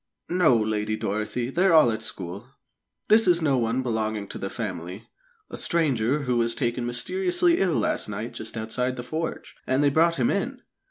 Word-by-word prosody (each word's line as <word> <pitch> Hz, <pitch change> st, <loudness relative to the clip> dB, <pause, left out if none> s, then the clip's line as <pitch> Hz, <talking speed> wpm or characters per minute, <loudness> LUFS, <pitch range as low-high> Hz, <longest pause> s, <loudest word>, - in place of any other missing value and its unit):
"No, 175 Hz, -9 st, +4 dB
Lady 110 Hz, -1 st, -1 dB
Dorothy; 110 Hz, +3 st, -3 dB
they're 180 Hz, +4 st, +3 dB
all 155 Hz, -7 st, +6 dB
at 110 Hz, -, -4 dB
school. 100 Hz, 0 st, -6 dB, 0.6 s
This 220 Hz, -1 st, +5 dB
is 175 Hz, -1 st, +5 dB
no 140 Hz, -6 st, +2 dB
one 115 Hz, +3 st, 0 dB
belonging 110 Hz, -3 st, -2 dB
to -, -, -7 dB
the 95 Hz, -, -4 dB
family 95 Hz, -2 st, -6 dB, 0.4 s
a -, -, -5 dB
stranger 145 Hz, -4 st, +1 dB
who 125 Hz, -2 st, 0 dB
was 115 Hz, 0 st, +1 dB
taken 120 Hz, -2 st, -1 dB
mysteriously 355 Hz, -, +1 dB
ill 180 Hz, -5 st, +2 dB
last -, -, 0 dB
night 105 Hz, +3 st, -5 dB
just 110 Hz, +1 st, -6 dB
outside 125 Hz, +3 st, -2 dB
the 120 Hz, -, -6 dB
forge, 160 Hz, +5 st, -5 dB
and 130 Hz, +2 st, +2 dB
they 145 Hz, -, +4 dB
brought 165 Hz, +3 st, +3 dB
him 125 Hz, -5 st, +1 dB
in. 245 Hz, +6 st, -3 dB
125 Hz, 180 wpm, -25 LUFS, 110-160 Hz, 0.6 s, all